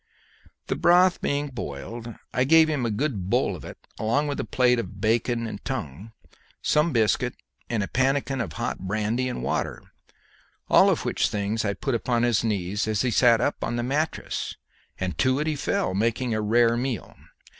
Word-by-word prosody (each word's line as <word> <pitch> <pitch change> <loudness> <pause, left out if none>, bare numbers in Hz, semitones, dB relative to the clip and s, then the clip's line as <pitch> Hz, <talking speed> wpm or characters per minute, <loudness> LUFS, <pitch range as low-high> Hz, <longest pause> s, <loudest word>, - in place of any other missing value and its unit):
The - - -2
broth 180 +1 +4
being 145 +1 -1
boiled, 115 - -7 0.2
I 125 - +2
gave 160 +4 +6
him 135 -6 0
a - - -1
good 105 -5 -2
bowl - - +1
of - - -10
it - - -9 0.2
along 130 +7 +1
with 145 -1 -3
a - - 0
plate 125 -1 +2
of 100 -4 -6
bacon 115 +2 +1
and 110 -3 -7
tongue, 105 - -5 0.5
some 150 +3 +2
biscuit 120 +1 +1 0.3
and 115 -3 0
a - - -3
pannikin 135 0 0
of 90 -9 -4
hot - - -3
brandy 110 +6 -1
and 125 - -5
water, - - -2 0.9
all - - +6
which - - 0
things 105 +2 -1
I 100 -1 -1
put 135 - -2
upon 120 0 0
his 120 -3 +2
knees 105 -1 -1
as 110 +1 0
he 125 - +1
sat 120 -1 +5
up 145 - -1
on 120 - -2
the 120 - -1
mattress, 150 +5 -2 0.4
and 90 -3 -2
to 130 0 +3
it 150 - -1
he 155 -1 0
fell, 95 -8 -1
making 115 +4 0
a 110 - 0
rare 115 +2 +3
meal. 125 -1 -3
120 Hz, 185 wpm, -25 LUFS, 105-130 Hz, 0.9 s, gave